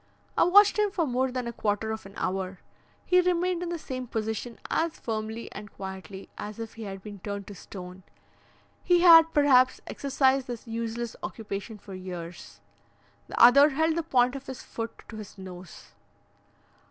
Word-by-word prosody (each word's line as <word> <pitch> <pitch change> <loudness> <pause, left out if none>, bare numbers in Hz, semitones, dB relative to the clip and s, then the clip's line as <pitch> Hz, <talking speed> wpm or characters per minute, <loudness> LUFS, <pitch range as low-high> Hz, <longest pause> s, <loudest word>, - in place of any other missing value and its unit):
I - - +4
watched 405 +4 +6
him 420 -1 +3
for 360 -4 0
more 260 -1 0
than 250 -1 -3
a 235 - -4
quarter 215 0 -1
of 220 -2 -6
an 195 - -15
hour; 185 0 -2 0.5
he 365 0 +5
remained 360 0 +1
in 355 - -3
the 345 - -2
same 255 -5 -6
position 220 +1 -3
as 325 0 -1
firmly 220 0 -4
and 210 -1 -9
quietly 190 0 -8
as 210 0 -6
if 225 -1 -6
he 225 -1 -8
had 195 -1 -7
been 205 -2 -9
turned 200 +1 -5
to 205 - -9
stone. 180 0 -10 0.8
He 350 -1 +4
had, 330 -2 +9
perhaps, 260 -4 +4
exercised 270 -1 +1
this 240 -2 -6
useless 230 0 -4
occupation 210 0 -6
for 195 -1 -11
years. 180 -2 -8 0.7
The - - -5
other 280 +5 +8
held 320 +3 +1
the 335 - +1
point 255 -5 +2
of 275 - -8
his 260 -1 -7
foot 230 0 -7
to 220 - -9
his 210 -1 -10
nose. 185 -2 -10
230 Hz, 175 wpm, -27 LUFS, 200-280 Hz, 0.8 s, had